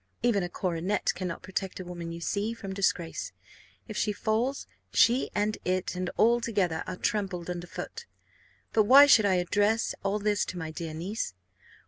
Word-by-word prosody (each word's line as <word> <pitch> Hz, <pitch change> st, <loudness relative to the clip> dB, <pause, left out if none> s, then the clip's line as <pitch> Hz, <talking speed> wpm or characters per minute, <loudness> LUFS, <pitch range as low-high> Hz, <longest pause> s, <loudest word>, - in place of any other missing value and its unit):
Even 235 Hz, -5 st, +3 dB
a 175 Hz, -, -3 dB
coronet 180 Hz, +2 st, -1 dB
cannot 180 Hz, -3 st, -5 dB
protect 190 Hz, 0 st, -4 dB
a -, -, -4 dB
woman, 175 Hz, -1 st, -6 dB
you 170 Hz, -, -6 dB
see, 205 Hz, +6 st, -2 dB
from 195 Hz, -4 st, -6 dB
disgrace: 180 Hz, -4 st, -1 dB, 0.5 s
if 215 Hz, -, -7 dB
she 210 Hz, -, +1 dB
falls, 225 Hz, +6 st, -1 dB, 0.3 s
she 245 Hz, +3 st, +4 dB
and 210 Hz, +1 st, 0 dB
it, 185 Hz, 0 st, -1 dB
and 180 Hz, 0 st, -2 dB
all 235 Hz, +2 st, +4 dB
together, 195 Hz, -8 st, 0 dB
are 185 Hz, -, -4 dB
trampled 190 Hz, -6 st, -2 dB
under 175 Hz, 0 st, -5 dB
foot. -, -, -7 dB, 0.7 s
But 215 Hz, -2 st, +4 dB
why 275 Hz, +6 st, +9 dB
should 220 Hz, -7 st, +6 dB
I 190 Hz, -, +3 dB
address 205 Hz, +5 st, +1 dB
all 195 Hz, +1 st, 0 dB
this 210 Hz, 0 st, +1 dB
to 180 Hz, -, -6 dB
my 160 Hz, -2 st, -4 dB
dear 160 Hz, -1 st, -6 dB
niece? 175 Hz, -, -4 dB
195 Hz, 175 wpm, -28 LUFS, 175-215 Hz, 0.7 s, why